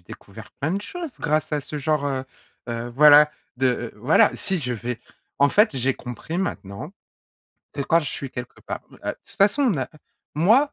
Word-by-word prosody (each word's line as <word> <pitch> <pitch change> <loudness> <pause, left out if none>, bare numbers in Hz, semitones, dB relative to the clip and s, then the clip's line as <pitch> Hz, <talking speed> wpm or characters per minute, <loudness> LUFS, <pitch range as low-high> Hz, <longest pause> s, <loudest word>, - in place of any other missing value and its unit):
découvert - - -12
plein 155 +5 0
de 200 - -2
choses 335 - -6
grâce 155 0 0
à 150 - +1
ce 150 +2 -6
genre, 145 0 0
heu 135 -2 -2 0.4
heu, 120 0 -3
voilà 150 +2 +8 0.3
de, 130 +1 +2
heu, 120 -2 -1
voilà 125 +9 +4
si 190 -2 0
je 125 -4 -2
vais 120 +1 -4 0.4
en 140 +1 +5
fait 210 -6 +3
j'ai 130 +1 +1
compris 125 +7 -6
maintenant, 150 - -4 0.8
que 145 - -5
quand 165 +4 +3
je 150 - -3
suis 135 - -5
quelque 125 -1 -8
part - - -5
heu, - - -14
de - - +2
toute - - -17
façon 205 +9 +4
on 150 - -2
a - - -3 0.5
moi 225 - +4
145 Hz, 195 wpm, -24 LUFS, 125-170 Hz, 0.8 s, voilà